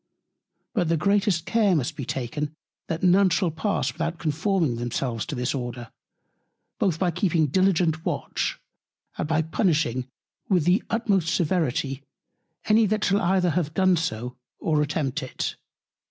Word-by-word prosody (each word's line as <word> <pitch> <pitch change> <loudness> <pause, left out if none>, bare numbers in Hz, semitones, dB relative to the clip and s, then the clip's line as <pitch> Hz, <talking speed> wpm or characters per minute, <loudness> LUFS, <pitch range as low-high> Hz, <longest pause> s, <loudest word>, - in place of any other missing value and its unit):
But 180 -8 +1
the 165 - +2
greatest 200 -1 +2
Care 210 -5 +3
must 135 -6 -1
be 140 - -5
taken, 145 +5 -3 0.3
that 165 +2 -3
none 185 +2 +5
pass 165 - 0
without 165 +4 -3
conforming 160 - 0
themselves 120 0 -2
to 155 - -4
this 125 0 -1
Order, 120 -3 -5 0.9
both 185 -6 +1
by 180 0 +1
keeping 170 -2 +1
diligent 165 0 +2
Watch, - - -2 0.6
and - - -1
by 160 0 +2
punishing 155 - 0 0.4
with 180 -6 +3
the 180 +6 +4
utmost 200 -7 +1
Severity, 150 -5 0 0.6
any 215 0 +4
that 215 +1 0
shall 200 +1 +2
either 180 0 +2
have 155 -1 -1
done 185 -1 +4
so, 125 -7 -3 0.2
or 155 -2 +1
attempt 145 -3 -1
it. 130 - -4
165 Hz, 140 wpm, -25 LUFS, 145-185 Hz, 0.9 s, none